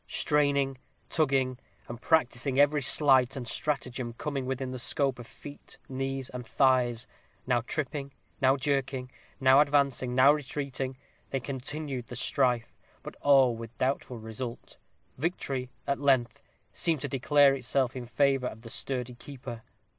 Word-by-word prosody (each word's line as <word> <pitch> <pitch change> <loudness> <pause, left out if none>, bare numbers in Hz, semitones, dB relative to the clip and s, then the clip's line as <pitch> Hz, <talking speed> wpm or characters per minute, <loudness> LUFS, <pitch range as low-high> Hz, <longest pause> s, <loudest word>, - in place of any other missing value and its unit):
Straining, 140 -3 +1 0.3
tugging, 135 -5 +1 0.3
and 120 0 -8
practising 135 -3 +1
every 145 +1 +4
sleight 135 -2 +4
and 125 -3 -5
stratagem 125 -5 -2
coming 135 +1 -4
within 130 0 -3
the 130 - -5
scope 135 0 +2
of 120 - -9
feet, 145 0 -12
knees, 135 -1 -3
and 125 0 -6
thighs 125 -1 +2 0.4
now 125 -2 +2
tripping, 140 +2 -3 0.3
now 135 +1 +4
jerking, 135 -2 -1 0.3
now 135 0 +6
advancing, 140 -4 +1
now 135 +3 +7
retreating, 135 -2 -4 0.3
they 135 - -1
continued 135 0 -4
the 125 - -8
strife, 125 -1 0 0.3
but - - -8
all 135 -4 +5
with 115 0 -9
doubtful 130 -1 -1
result. 110 +2 -7 0.4
Victory, 135 -5 -2 0.2
at 140 - -1
length, 130 -5 +2 0.3
seemed 160 -5 0
to - - -1
declare 140 +1 +4
itself 130 0 0
in 125 -2 -6
favor 135 0 +2
of 110 - -8
the 115 -1 -9
sturdy 125 -2 -2
keeper. 120 -1 -9
130 Hz, 140 wpm, -29 LUFS, 125-140 Hz, 0.4 s, now